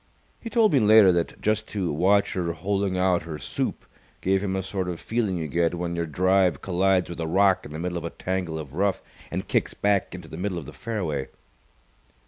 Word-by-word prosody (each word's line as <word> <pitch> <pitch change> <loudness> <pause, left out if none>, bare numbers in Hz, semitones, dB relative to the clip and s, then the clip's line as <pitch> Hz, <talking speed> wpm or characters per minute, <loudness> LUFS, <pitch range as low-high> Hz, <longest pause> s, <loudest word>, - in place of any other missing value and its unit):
He 230 - -7
told 225 -4 +3
me 140 - +5
later 110 -3 +7
that 85 -1 -1
just 110 0 0
to 95 -7 -2
watch 100 +6 +3
her 85 -2 -1
holing 95 +2 -1
out 90 -1 +2
her 80 -2 -6
soup - - -3 0.3
gave 95 +1 +1
him 95 -1 -1
a 95 - -1
sort 95 -1 -3
of 85 -2 -4
feeling 110 -5 -1
you 80 -2 -3
get 85 +2 +1
when 85 0 -3
your 85 -1 -2
drive 90 0 +2
collides 95 0 +1
with 85 - -7
a 80 - -2
rock 95 +3 +3
in - - -13
the 75 - -6
middle 90 +1 -2
of - - -10
a - - -2
tangle 90 -3 -3
of 75 -4 -7
rough 95 +3 0 0.3
and - - -4
kicks - - 0
back 100 -3 +1
into 90 -3 -9
the 80 - -9
middle 95 0 -2
of 80 - -6
the 75 - -10
fairway. 85 -12 -3
90 Hz, 220 wpm, -25 LUFS, 85-100 Hz, 0.3 s, later